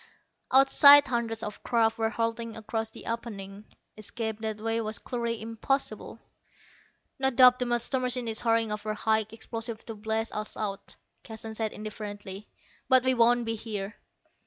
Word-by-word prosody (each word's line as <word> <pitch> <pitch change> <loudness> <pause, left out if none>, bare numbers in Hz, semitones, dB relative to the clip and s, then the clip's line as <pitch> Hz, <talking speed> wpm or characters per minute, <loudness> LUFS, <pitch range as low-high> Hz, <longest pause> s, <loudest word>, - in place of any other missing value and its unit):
Outside 280 +2 +8
hundreds 235 -3 -2
of 210 -1 -6
craft 230 -2 +1
were 225 0 +1
hurtling 230 0 -3
across 220 0 -3
the - - -11
opening. 210 -3 -6 0.3
Escape 220 +1 -4
that 220 -1 -3
way 225 +1 -1
was 215 -1 -3
clearly 235 -2 -3
impossible. 230 +5 -3 1.0
"No 265 0 +3
doubt 250 0 +6
the 250 - -1
master 240 +2 0
machine 250 -1 -1
is 220 -1 -1
hurrying 230 -2 +2
over 215 0 -3
high 220 0 +1
explosives 225 0 -6
to 225 - -7
blast 220 +1 -3
us 215 0 -4
out," 200 -2 -4 0.3
Keston 220 0 -7
said 220 -1 -2
indifferently; 205 -1 -7 0.4
"but 260 -2 +6
we 260 0 +3
won't 240 0 +3
be 225 - -1
here." 215 -2 -5
225 Hz, 155 wpm, -28 LUFS, 215-235 Hz, 1.0 s, Outside